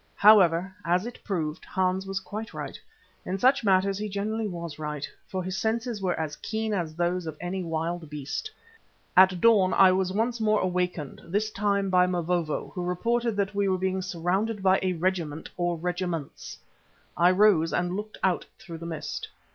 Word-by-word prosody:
However, 190 -3 +5
as 180 +4 +1
it 240 - -8
proved, 160 -6 -3
Hans 190 +1 -1
was 195 0 -2
quite 215 +4 -7
right; - - -6 0.4
in 185 - -3
such 260 +4 +3
matters 195 0 +2
he 215 0 -3
generally 215 +2 -2
was 170 -5 -6
right, 150 -1 -4 0.2
for 185 -1 -3
his 185 +1 -3
senses 225 -1 -1
were 180 -3 -1
as 155 -2 -3
keen 220 0 -3
as 165 -5 -2
those 175 0 -1
of 155 -1 -6
any 180 +2 -3
wild 165 -1 -3
beast. 150 - -4 0.7
At 185 -1 +6
dawn 200 -3 +5
I 190 -1 +7
was 185 0 +1
once 230 +4 -1
more 215 -1 +3
awakened, 180 -5 -2
this 205 +5 -1
time 200 -2 0
by 180 0 +5
Mavovo, 175 -3 -1
who 180 - -3
reported 230 +6 0
that 200 0 -1
we 200 0 +1
were 185 - +2
being 190 0 -1
surrounded 190 +4 -1
by 190 0 +4
a 185 -1 0
regiment, 165 -3 -2
or 175 -1 -1
regiments. 175 -3 -4 0.6
I 175 +1 +5
rose 185 -4 +4
and 175 +1 0
looked 210 +1 -6
out 185 -2 +1
through 165 -2 -9
the 170 - -6
mist. 165 -2 -5
185 Hz, 180 wpm, -27 LUFS, 175-205 Hz, 0.7 s, I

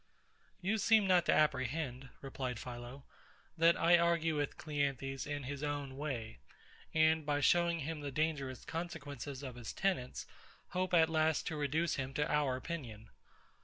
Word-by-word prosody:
You 205 +4 0
seem 220 +1 +5
not 180 -3 +4
to - - +5
apprehend, 135 -2 0
replied 130 -3 -4
PHILO, 120 +3 -8 0.5
that 165 +1 +5
I 170 +1 +5
argue 170 -2 +2
with 145 -1 -2
CLEANTHES 135 -3 -2
in 145 -1 -3
his 140 +2 -5
own 145 -2 -3
way; 130 -6 -4 0.5
and, 160 0 +4
by 145 0 0
showing 170 +3 +3
him 150 +1 -4
the 145 - -4
dangerous 140 -3 -2
consequences 145 -5 -5
of 130 -2 -5
his 120 -3 -6
tenets, 185 -11 -1 0.4
hope 185 0 0
at 160 -1 +6
last 160 -1 +1
to 160 - -4
reduce 150 +3 0
him 135 0 -4
to 150 +1 +1
our 145 -3 +2
opinion. 125 -7 -6
145 Hz, 155 wpm, -35 LUFS, 135-165 Hz, 0.5 s, at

